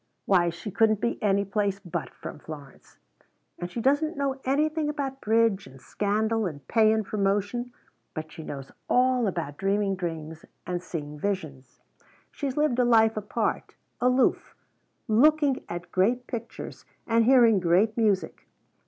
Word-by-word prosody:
Why 175 -3 +3
she 170 +5 -7
couldn't 215 0 +3
be 235 - -2
any 200 -1 +2
place 200 0 -1
but 170 -6 -5
from - - -9
Florence 145 -3 -11 0.6
and 175 - -4
she 205 - -5
doesn't 290 +6 +1
know 275 -1 -1
anything 300 +3 +1
about 275 -3 -4
bridge 220 -3 +2
and 135 - -14
scandal 215 - 0
and 145 -5 -8
pay 220 -1 +4
and 220 -1 +1
promotion 205 +5 -1 0.4
but 155 0 -6
she - - -9
knows 135 -3 -7 0.2
all 250 -2 +3
about 160 -6 -3
dreaming 195 0 +1
dreams 160 -3 -5 0.2
and 175 0 -3
seeing 150 -4 -6
visions. 145 -10 -4 0.5
She's 275 -2 -4
lived 295 -5 +2
a - - +5
life 225 -2 +4
apart 215 -1 -2 0.3
aloof 250 +1 +2 0.5
looking 285 +4 +3
at 175 0 -6
great 240 +7 +1
pictures 235 -1 -7 0.2
and 230 -1 +3
hearing 235 -5 +6
great 185 +5 +3
music. 210 -5 0
210 Hz, 145 wpm, -27 LUFS, 175-245 Hz, 0.6 s, hearing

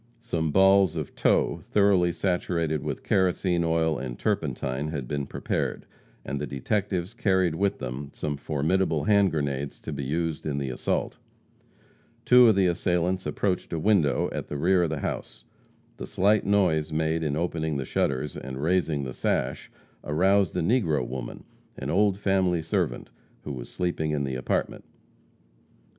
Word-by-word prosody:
Some 85 -10 -2
balls 95 -1 +5
of 75 -4 -4
tow - - +2
thoroughly 100 -4 +3
saturated 85 -4 -1
with - - -4
kerosene 90 -2 +1
oil 80 -2 +1
and 60 -2 -5
turpentine 65 +4 -2
had 70 -5 -4
been 70 0 -3
prepared, - - -3 0.4
and 70 - -3
the 75 - -3
detectives 95 - -2
carried 95 -6 +1
with 100 +4 0
them 65 +2 -5
some 75 -1 -3
formidable 75 +6 0
hand 100 -2 +4
grenades 70 -3 -3
to - - -5
be 70 - -4
used 80 +3 -2
in 70 -2 -2
the 70 -2 -2
assault. 60 - -2 1.1
Two 125 -1 +7
of 110 - +4
the 95 -1 +3
assailants 90 +1 0
approached 95 -3 -1
a - - 0
window 85 -5 +2
at - - -4
the 75 - -4
rear 90 +4 +3
of 85 - +1
the 80 -3 -3
house. - - -5 0.5
The - - -6
slight 105 +3 +2
noise 85 -6 +2
made 80 +1 0
in 75 -3 -1
opening 80 -2 -1
the 65 - -3
shutters 70 +2 -1
and 65 0 -6
raising 80 -4 +1
the 65 -2 -5
sash - - -2 0.3
aroused 95 +5 +2
a - - +1
negro 80 - +1
woman, 65 0 -6 0.3
an - - -4
old 100 +1 +3
family 95 -4 +1
servant, 60 -6 -2 0.3
who 75 - -5
was - - -7
sleeping 85 -3 -2
in 70 -2 0
the 65 -1 -3
apartment. 65 0 -2
80 Hz, 160 wpm, -26 LUFS, 75-95 Hz, 1.1 s, Two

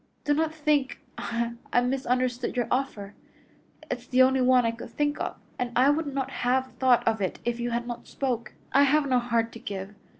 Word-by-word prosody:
Do 290 - +2
not 315 +1 +1
think 300 -3 0 0.2
I 235 +1 -1
misunderstand 250 -1 -1
your 245 - +1
offer. 220 -6 -2 0.8
It's - - -4
the 260 0 +5
only 260 0 +3
one 250 -1 +5
I 230 - +2
could 230 - -9
think 295 0 -1
of, - - -3 0.2
and 245 -1 -1
I 260 +3 +5
would 310 +1 -1
not 270 -1 -2
have 260 +1 +1
thought 255 -3 +4
of 220 -2 +2
it 190 - -1
if 240 0 -1
you 240 0 -1
had 235 0 -2
not 240 -1 -7
spoke. 245 -4 -3 0.2
I 275 - +6
have 285 +1 +4
no 255 -2 +3
heart 230 -1 0
to 230 - -10
give. 195 -1 -6
250 Hz, 200 wpm, -27 LUFS, 235-270 Hz, 0.8 s, I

